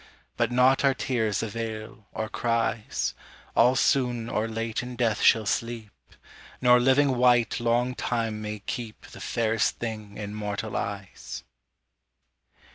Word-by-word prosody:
But -, -, +1 dB
naught 125 Hz, +2 st, +4 dB
our 135 Hz, -1 st, +4 dB
tears 110 Hz, -7 st, 0 dB
avail, 110 Hz, +1 st, -6 dB
or 110 Hz, -, -3 dB
cries; 115 Hz, -1 st, -1 dB, 0.4 s
All 125 Hz, +2 st, +5 dB
soon 120 Hz, -4 st, +1 dB
or 110 Hz, +1 st, 0 dB
late 115 Hz, 0 st, -2 dB
in 125 Hz, 0 st, -7 dB
death 115 Hz, -3 st, +1 dB
shall 110 Hz, -2 st, +5 dB
sleep; 115 Hz, 0 st, -2 dB, 0.7 s
Nor 125 Hz, -1 st, +6 dB
living 130 Hz, +1 st, +3 dB
wight 120 Hz, -1 st, +4 dB
long 120 Hz, +2 st, +1 dB
time 115 Hz, -4 st, -2 dB
may 105 Hz, 0 st, -4 dB
keep 115 Hz, -4 st, -5 dB
The -, -, -12 dB
fairest 115 Hz, -1 st, 0 dB
thing 110 Hz, -3 st, -6 dB
in 105 Hz, -1 st, -5 dB
mortal 105 Hz, 0 st, -4 dB
eyes. 100 Hz, -2 st, -5 dB
115 Hz, 130 wpm, -27 LUFS, 110-125 Hz, 0.7 s, Nor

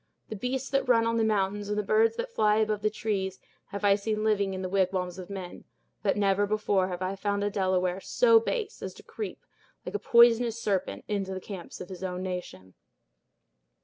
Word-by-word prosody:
The 220 Hz, -, -4 dB
beasts 255 Hz, +5 st, -2 dB
that 275 Hz, -2 st, +1 dB
run 230 Hz, -2 st, +5 dB
on 230 Hz, 0 st, +1 dB
the 225 Hz, -, +2 dB
mountains, 205 Hz, -1 st, 0 dB
and 210 Hz, -, -1 dB
the 210 Hz, -, +1 dB
birds 450 Hz, -, +3 dB
that 480 Hz, +1 st, -4 dB
fly 210 Hz, -, +3 dB
above 215 Hz, -1 st, +1 dB
the 215 Hz, -, +2 dB
trees, 195 Hz, -3 st, -2 dB, 0.3 s
have 200 Hz, 0 st, -4 dB
I 200 Hz, -, +6 dB
seen 215 Hz, +1 st, -1 dB
living 200 Hz, -3 st, +1 dB
in 190 Hz, -, -4 dB
the -, -, -1 dB
wigwams 185 Hz, -1 st, 0 dB
of 185 Hz, -, -8 dB
men; 190 Hz, -3 st, -7 dB, 0.4 s
but -, -, +1 dB
never 200 Hz, 0 st, +2 dB
before 205 Hz, -3 st, +1 dB
have 180 Hz, 0 st, -4 dB
I 185 Hz, +1 st, -2 dB
found 200 Hz, +1 st, -1 dB
a 205 Hz, -, 0 dB
Delaware 185 Hz, -2 st, 0 dB
so 460 Hz, -, +4 dB
base 450 Hz, -1 st, -3 dB
as -, -, -6 dB
to -, -, -14 dB
creep, 430 Hz, -, -7 dB, 0.4 s
like -, -, -5 dB
a 415 Hz, -, -1 dB
poisonous 235 Hz, -1 st, +5 dB
serpent, 200 Hz, -5 st, -2 dB
into 195 Hz, -2 st, -2 dB
the -, -, -4 dB
camps 190 Hz, -2 st, -8 dB
of 180 Hz, -, -8 dB
his 185 Hz, -1 st, -8 dB
nation." 180 Hz, -, -5 dB
205 Hz, 205 wpm, -28 LUFS, 190-225 Hz, 0.4 s, I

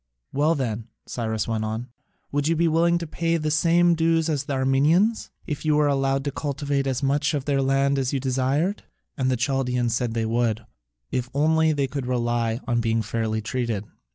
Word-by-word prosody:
"Well 150 Hz, +4 st, +2 dB
then," 115 Hz, -5 st, -3 dB, 0.2 s
Cyrus 110 Hz, -3 st, -2 dB
went 110 Hz, -1 st, -1 dB
on, 110 Hz, +3 st, -4 dB, 0.4 s
"would 145 Hz, +1 st, 0 dB
you 165 Hz, -, +2 dB
be 170 Hz, +1 st, +2 dB
willing 170 Hz, +2 st, +3 dB
to 170 Hz, -, -4 dB
pay 165 Hz, +1 st, -1 dB
the 155 Hz, -1 st, -1 dB
same 170 Hz, +3 st, +4 dB
dues 165 Hz, 0 st, +2 dB
as 145 Hz, -3 st, -1 dB
the 140 Hz, -, -3 dB
Armenians, 145 Hz, +12 st, +2 dB, 0.2 s
if 150 Hz, -5 st, -4 dB
you 155 Hz, -1 st, +2 dB
were 150 Hz, 0 st, +3 dB
allowed 135 Hz, -1 st, +1 dB
to 140 Hz, -, -2 dB
cultivate 140 Hz, -1 st, -2 dB
as 130 Hz, +1 st, -1 dB
much 145 Hz, +3 st, +1 dB
of 140 Hz, -2 st, -3 dB
their 140 Hz, -2 st, +1 dB
land 135 Hz, +1 st, +2 dB
as 130 Hz, -1 st, -1 dB
you 140 Hz, -, 0 dB
desired?" 135 Hz, +8 st, 0 dB, 0.3 s
And 130 Hz, -3 st, 0 dB
the 130 Hz, -, +1 dB
Chaldaeans 125 Hz, -2 st, 0 dB
said 120 Hz, -1 st, -1 dB
they 115 Hz, -1 st, 0 dB
would, 115 Hz, -1 st, 0 dB, 0.5 s
if 125 Hz, 0 st, -2 dB
only 160 Hz, +2 st, +3 dB
they 145 Hz, -2 st, +1 dB
could 135 Hz, -1 st, -4 dB
rely 120 Hz, -1 st, 0 dB
on 120 Hz, -1 st, +1 dB
being 115 Hz, 0 st, 0 dB
fairly 110 Hz, 0 st, -2 dB
treated. 115 Hz, -3 st, -2 dB
135 Hz, 195 wpm, -24 LUFS, 120-155 Hz, 0.5 s, same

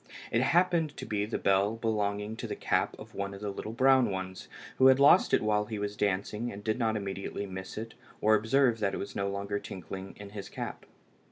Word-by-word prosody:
It 115 Hz, -, +2 dB
happened 165 Hz, +1 st, +2 dB
to -, -, -6 dB
be 105 Hz, -1 st, -1 dB
the 110 Hz, -, -2 dB
bell 100 Hz, +3 st, +2 dB
belonging 105 Hz, -1 st, -1 dB
to -, -, -5 dB
the -, -, -4 dB
cap -, -, 0 dB
of -, -, -12 dB
one 100 Hz, 0 st, -4 dB
of 100 Hz, -, -11 dB
the 105 Hz, -1 st, -2 dB
little 105 Hz, +2 st, -6 dB
brown 130 Hz, +1 st, +4 dB
ones, 95 Hz, -1 st, -5 dB, 0.3 s
who 130 Hz, -, +8 dB
had 130 Hz, 0 st, +6 dB
lost 140 Hz, +1 st, +6 dB
it -, -, +3 dB
while 105 Hz, -1 st, +2 dB
he 110 Hz, 0 st, -5 dB
was 105 Hz, 0 st, -3 dB
dancing, 105 Hz, +4 st, -1 dB
and 100 Hz, +1 st, -9 dB
did 110 Hz, +3 st, -1 dB
not 110 Hz, -2 st, +1 dB
immediately 100 Hz, 0 st, -4 dB
miss 95 Hz, 0 st, -7 dB
it 110 Hz, +1 st, -5 dB, 0.3 s
or 110 Hz, -, +4 dB
observe 115 Hz, +2 st, +3 dB
that 100 Hz, -2 st, 0 dB
it -, -, -3 dB
was -, -, -6 dB
no 100 Hz, 0 st, -1 dB
longer 100 Hz, +1 st, -2 dB
tinkling 95 Hz, +1 st, -8 dB
in 100 Hz, -1 st, -10 dB
his 100 Hz, -2 st, -7 dB
cap. -, -, -6 dB
105 Hz, 225 wpm, -30 LUFS, 100-115 Hz, 0.3 s, who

